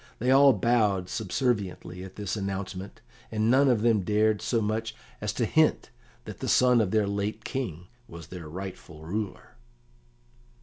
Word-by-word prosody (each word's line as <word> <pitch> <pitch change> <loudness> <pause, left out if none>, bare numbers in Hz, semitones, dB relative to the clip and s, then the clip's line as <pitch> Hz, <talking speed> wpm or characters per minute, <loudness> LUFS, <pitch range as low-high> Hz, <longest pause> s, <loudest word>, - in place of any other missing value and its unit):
They 125 +3 +1
all 140 +1 +7
bowed 105 -7 +1
subserviently 100 -5 -2
at 95 0 -10
this 105 -1 -3
announcement, 100 -1 -5 0.3
and 110 +1 +1
none 135 +1 +5
of 115 -4 +2
them 115 -3 +3
dared 105 +2 +1
so 115 - 0
much 110 +1 -2 0.3
as - - -1
to - - 0
hint - - +2 0.3
that - - -8
the - - -4
son 125 -2 +5
of 105 - 0
their 110 +1 +2
late 100 +2 -3
King 90 - -4 0.2
was 85 0 -11
their 85 -4 -8
rightful 85 -3 -8
ruler. 105 +6 -5
105 Hz, 160 wpm, -27 LUFS, 95-115 Hz, 0.3 s, all